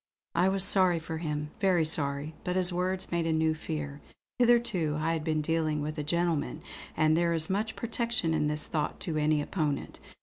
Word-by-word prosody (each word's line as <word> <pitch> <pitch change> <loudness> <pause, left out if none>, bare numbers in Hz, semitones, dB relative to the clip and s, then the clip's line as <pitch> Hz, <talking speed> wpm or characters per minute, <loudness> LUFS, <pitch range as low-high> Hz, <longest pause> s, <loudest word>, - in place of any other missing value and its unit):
I 180 +3 +3
was 195 -1 +1
sorry 185 -3 +5
for 160 0 -5
him, 150 -2 -3
very 185 -5 +3
sorry; 145 -1 -1
but 180 - -2
his 185 -1 +1
words 185 +1 -2
made 170 -1 0
a - - +1
new 160 0 +2
fear. 150 -2 -5 0.4
Hitherto 235 -10 +3
I 165 +2 0
had 160 -2 -2
been 155 -1 0
dealing 155 -1 0
with 155 +1 -3
a - - -2
gentleman, 165 -1 -1 0.3
and 155 0 +4
there 170 0 +2
is 160 +2 +1
much 215 +3 -1
protection 235 -7 -1
in 150 -1 +1
this 150 0 0
thought 150 -2 -2
to 160 -3 -2
any 150 -1 +2
opponent. 150 -4 -2
160 Hz, 195 wpm, -29 LUFS, 155-180 Hz, 0.4 s, sorry